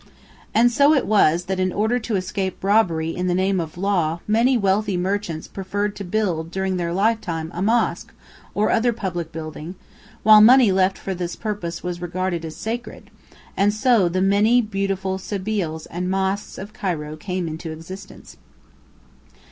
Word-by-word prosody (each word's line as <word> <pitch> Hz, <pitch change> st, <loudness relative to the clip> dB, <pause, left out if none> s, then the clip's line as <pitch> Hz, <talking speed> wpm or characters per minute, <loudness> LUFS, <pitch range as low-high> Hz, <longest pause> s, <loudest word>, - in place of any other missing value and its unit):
] -, -, -27 dB
And 240 Hz, +2 st, +5 dB
so 285 Hz, +5 st, +5 dB
it 275 Hz, -, +1 dB
was 175 Hz, -5 st, +3 dB
that 190 Hz, 0 st, -2 dB
in 185 Hz, 0 st, +1 dB
order 220 Hz, +6 st, +1 dB
to 225 Hz, -2 st, -3 dB
escape 190 Hz, 0 st, -3 dB
robbery 175 Hz, -6 st, +2 dB
in 180 Hz, 0 st, -2 dB
the 175 Hz, -, +1 dB
name 190 Hz, +1 st, +1 dB
of 160 Hz, -1 st, -5 dB
law 175 Hz, -4 st, 0 dB
many 235 Hz, +4 st, +3 dB
wealthy 200 Hz, -1 st, +1 dB
merchants 180 Hz, -3 st, -2 dB
preferred 205 Hz, +2 st, -3 dB
to 200 Hz, -, -6 dB
build 180 Hz, -5 st, -1 dB
during 190 Hz, +1 st, -2 dB
their 170 Hz, -1 st, -2 dB
lifetime 180 Hz, -5 st, -1 dB
a 175 Hz, -, -4 dB
mosque 225 Hz, +4 st, +1 dB, 0.4 s
or 210 Hz, -, +2 dB
other 235 Hz, +1 st, +2 dB
public 175 Hz, -6 st, -4 dB
building, 160 Hz, +2 st, -7 dB, 0.5 s
while 215 Hz, 0 st, +8 dB
money 240 Hz, -1 st, +7 dB
left 190 Hz, 0 st, +2 dB
for 195 Hz, -, -4 dB
this 175 Hz, -1 st, -4 dB
purpose 200 Hz, -6 st, -4 dB
was 175 Hz, -1 st, -4 dB
regarded 175 Hz, -1 st, -2 dB
as 160 Hz, -1 st, -6 dB
sacred, 235 Hz, +2 st, -6 dB, 0.4 s
and 205 Hz, +1 st, +2 dB
so 215 Hz, -5 st, +3 dB
the 185 Hz, +2 st, -1 dB
many 205 Hz, +5 st, +4 dB
beautiful 195 Hz, -3 st, -2 dB
sebīls 190 Hz, -5 st, -3 dB
and 180 Hz, +2 st, -3 dB
mosques 195 Hz, +1 st, -1 dB
of 205 Hz, +2 st, -8 dB
Cairo 165 Hz, -9 st, -3 dB
came 180 Hz, +1 st, -4 dB
into 160 Hz, +1 st, -6 dB
existence. 165 Hz, +5 st, -10 dB
190 Hz, 165 wpm, -22 LUFS, 175-210 Hz, 0.5 s, while